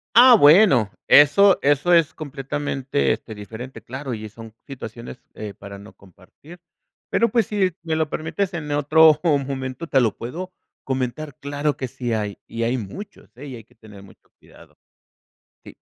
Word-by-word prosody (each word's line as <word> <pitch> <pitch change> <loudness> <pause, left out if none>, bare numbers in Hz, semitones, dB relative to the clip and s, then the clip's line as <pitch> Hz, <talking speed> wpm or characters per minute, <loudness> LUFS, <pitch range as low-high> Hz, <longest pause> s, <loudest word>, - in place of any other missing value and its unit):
Ah 245 +1 +9
bueno, 145 - +5 0.2
eso 185 +7 +6
eso 145 +4 +2
es 165 -3 +4
completamente, 135 - -2
este, - - -8
diferente, 110 +5 -9
claro, 130 +1 -7
y 110 -1 -7
son 110 +1 -13
situaciones, 120 -2 -9 0.2
eh, 105 -2 -8
para 100 0 -11
no 100 +2 -14
compartir, 100 - -18 0.5
pero 230 - +2
pues 230 -4 +1
sí 195 -3 0
me 165 -1 -3
lo 160 -1 0
permites 185 +5 -3
en 155 -3 -5
otro 155 +1 +5
momento 140 -1 -2
te 135 - +2
lo 115 -6 +1
puedo 175 +11 -7 0.3
comentar, 130 +2 -4
claro 145 +1 -2
que 130 - -4
sí 125 -1 -4
hay, 105 -2 -3
y 115 - -6
hay 120 +3 0
muchos, 160 - -10
eh, 140 +4 -10
y 130 - -8
hay 115 - -11
que 110 - -28
tener 105 -3 -15
mucho 100 - -20
cuidado. - - -20 0.9
Sí. - - -13
135 Hz, 165 wpm, -22 LUFS, 115-160 Hz, 0.9 s, Ah